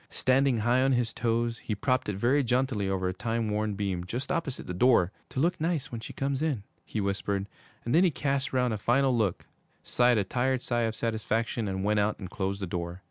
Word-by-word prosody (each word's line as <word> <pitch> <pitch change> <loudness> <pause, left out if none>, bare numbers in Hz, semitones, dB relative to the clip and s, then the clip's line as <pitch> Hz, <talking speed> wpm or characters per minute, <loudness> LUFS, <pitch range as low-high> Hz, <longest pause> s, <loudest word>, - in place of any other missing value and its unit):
Standing 130 -1 +2
high 120 +4 +3
on 135 0 +3
his 120 -2 0
toes, 115 0 0
he 105 - -3
propped 130 +2 0
it 105 - -2
very 125 +8 +2
jauntily 125 -5 0
over 95 -1 0
a 90 - -1
time 115 +2 -2
worn 105 0 -1
beam 95 -3 -2
just 120 - -4
opposite 165 -7 -2
the 90 - -4
door. 95 -3 +4 0.2
'To - - -4
look 170 +3 +1
nice 165 -3 -1
when 115 -2 -5
she - - -7
comes 140 0 -2
in,' 145 -10 0 0.2
he 110 - -4
whispered; 100 0 -1 0.4
and 120 - -1
then 170 - +6
he 185 - +5
cast 140 -3 -1
round 125 -2 +1
a 105 - -3
final 130 +4 +3
look, 105 -6 0 0.4
sighed 120 -1 +3
a 105 - +2
tired 130 +5 0
sigh 120 -2 +1
of 110 - -6
satisfaction 115 0 -1
and 95 0 -2
went 105 +1 +2
out 105 +1 +1
and 95 -3 -8
closed 100 0 -2
the - - +1
door. 85 -1 -4
115 Hz, 225 wpm, -28 LUFS, 100-130 Hz, 0.4 s, then